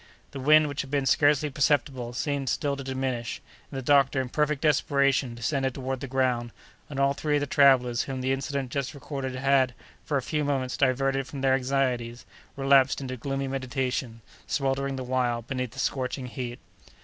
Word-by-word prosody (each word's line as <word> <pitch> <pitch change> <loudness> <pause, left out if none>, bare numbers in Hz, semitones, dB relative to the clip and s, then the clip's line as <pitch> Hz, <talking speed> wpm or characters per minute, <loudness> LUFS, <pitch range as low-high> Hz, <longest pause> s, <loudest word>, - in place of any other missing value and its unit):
The 140 - -7
wind, 155 +3 +5
which 145 -1 -3
had 140 - -9
been 140 -1 0
scarcely 145 +2 +3
perceptible, 135 -3 +1
seemed 140 +1 -2
still 145 0 0
to 140 - -7
diminish, 130 -3 -3 0.3
and 135 - -7
the 135 - -4
doctor 140 0 +4
in 130 -1 -2
perfect 150 0 0
desperation 140 -4 +2
descended 130 +2 -1
toward 130 0 -3
the 140 - -5
ground, 125 -2 0 0.4
and 140 -2 -5
all 140 0 +3
three 150 +1 -1
of 145 - +1
the - - 0
travellers, 130 -4 +4
whom 130 -1 -4
the 130 +1 0
incident 135 -1 -2
just 140 +2 -3
recorded 135 -2 -5
had, 130 -1 +2 0.3
for 145 - 0
a 135 - -2
few 150 +2 -1
moments, 135 -3 -1
diverted 135 0 +1
from 140 -1 -7
their 135 -1 +3
anxieties, 125 -3 -1 0.3
relapsed 135 -1 +4
into 130 -2 -5
gloomy 135 +2 -3
meditation, 130 -3 -3 0.3
sweltering 135 0 -1
the 130 - -4
while 125 -2 0
beneath 130 0 -3
the - - -14
scorching 130 0 -2
heat. 125 -1 -5
135 Hz, 185 wpm, -27 LUFS, 130-140 Hz, 0.4 s, wind